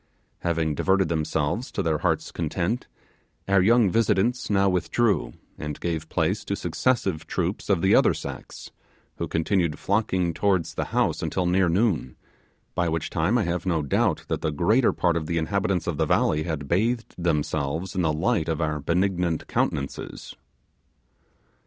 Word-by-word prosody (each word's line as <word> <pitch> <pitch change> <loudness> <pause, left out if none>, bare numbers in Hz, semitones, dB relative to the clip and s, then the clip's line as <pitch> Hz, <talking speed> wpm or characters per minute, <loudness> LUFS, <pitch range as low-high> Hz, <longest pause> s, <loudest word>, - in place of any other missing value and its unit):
Having 80 -2 0
diverted 95 +3 +2
themselves 80 - -1
to 100 - -2
their 80 -3 0
hearts' - - 0
content, 90 +8 -2 0.6
our 95 -1 +4
young 110 0 +4
visitants 115 +2 +1
now 100 -1 +3
withdrew, 90 - +1 0.3
and 75 -1 -5
gave 80 -2 -3
place - - 0
to - - -1
successive 95 -11 -1
troops 90 +2 -2
of 95 -5 +2
the 95 - +4
other - - +5
sex, - - -8 0.5
who - - -3
continued 85 -1 0
flocking 95 -4 0
towards 95 -4 +1
the - - -2
house - - 0
until 90 - -1
near 90 0 +3
noon; 85 - +1 0.6
by 85 -1 0
which 80 -1 -2
time 95 +10 +1
I 115 - +2
have 90 +1 -2
no 80 -4 +1
doubt 70 - +1
that - - -2
the - - 0
greater 105 - +3
part 85 -2 +1
of 80 -2 -2
the 85 - -1
inhabitants 95 +1 0
of 85 -4 -2
the - - +1
valley 75 - +2
had 80 -4 -3
bathed 115 - 0
themselves 80 +1 -1
in 95 - 0
the 80 -3 +2
light 80 +2 0
of 80 - -1
our 75 -2 -1
benignant 90 +1 0
countenances. 70 0 -3
85 Hz, 160 wpm, -25 LUFS, 80-100 Hz, 0.6 s, other